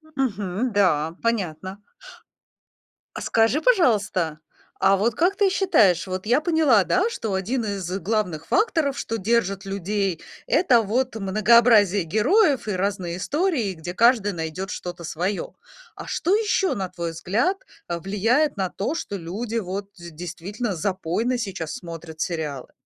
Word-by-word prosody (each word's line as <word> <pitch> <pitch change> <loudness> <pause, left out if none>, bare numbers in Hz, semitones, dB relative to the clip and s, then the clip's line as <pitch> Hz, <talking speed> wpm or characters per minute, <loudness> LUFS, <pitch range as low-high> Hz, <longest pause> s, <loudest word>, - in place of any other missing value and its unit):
Мгм. 215 -2 -1
Да, 165 -5 +2
понятно. 190 -3 -2 1.3
А - - -6
скажи, 225 +6 +2
пожалуйста, 205 - +2 0.4
а 195 +1 +4
вот 215 +3 0
как 360 +4 +2
ты 400 -2 +3
считаешь, 210 - +3
вот 185 +1 -4
я 245 +6 +3
поняла, 310 - +4
да, 375 +5 +2
что 220 - -4
1 225 +6 -1
из 195 -4 -4
главных 185 -5 -2
факторов, 320 - +1
что 225 -4 -3
держат 200 -2 0
людей,- 195 -2 -2 0.3
это 260 - +4
вот 240 +3 -1
многообразие 215 -1 +4
героев 255 - +2
и - - -1
разные 185 -2 -2
истории, 280 - 0
где 175 +2 -7
каждый 230 -2 +4
найдет 170 +3 -5
что-то 175 -1 -6
свое. 180 +5 -3 0.4
А - - -9
что 365 - 0
еще, 410 -3 +1
на 190 -2 -3
твой 170 -2 -4
взгляд, 215 - 0 0.3
влияет 210 - +1
на 190 -2 -1
то, 240 - -3
что 205 - -4
люди 210 +7 -4
вот 195 0 -4
д 170 -1 -10
действительно 180 +6 -5
запойно 190 +8 -1
сейчас 190 -8 -4
смотрят 165 -2 -8
сериалы? 155 -7 -4
200 Hz, 140 wpm, -23 LUFS, 180-240 Hz, 1.3 s, а